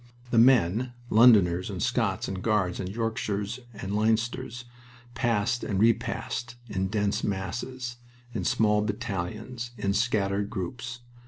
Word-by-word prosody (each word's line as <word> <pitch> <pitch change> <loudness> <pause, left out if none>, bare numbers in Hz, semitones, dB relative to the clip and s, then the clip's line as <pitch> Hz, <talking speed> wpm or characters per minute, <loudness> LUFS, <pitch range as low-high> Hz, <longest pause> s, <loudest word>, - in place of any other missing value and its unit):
The 115 - +5
men, 120 0 +4 0.2
Londoners, 100 -6 +6
and - - -5
Scots, - - 0
and 95 -1 -4
Guards, 100 -5 +1
and 95 - -3
Yorkshires, 110 0 -2
and 100 -2 -5
Leinsters, 115 +2 0 0.5
passed 120 -2 0
and 95 -2 -1
repassed 115 +1 0
in 95 -3 -1
dense 100 0 0
masses, 120 +6 -3 0.4
in 100 -5 -2
small 105 +2 +3
battalions, 110 +2 -4
in 100 -2 0
scattered 105 -2 +1
groups. 120 +4 -5
110 Hz, 120 wpm, -27 LUFS, 100-120 Hz, 0.5 s, Londoners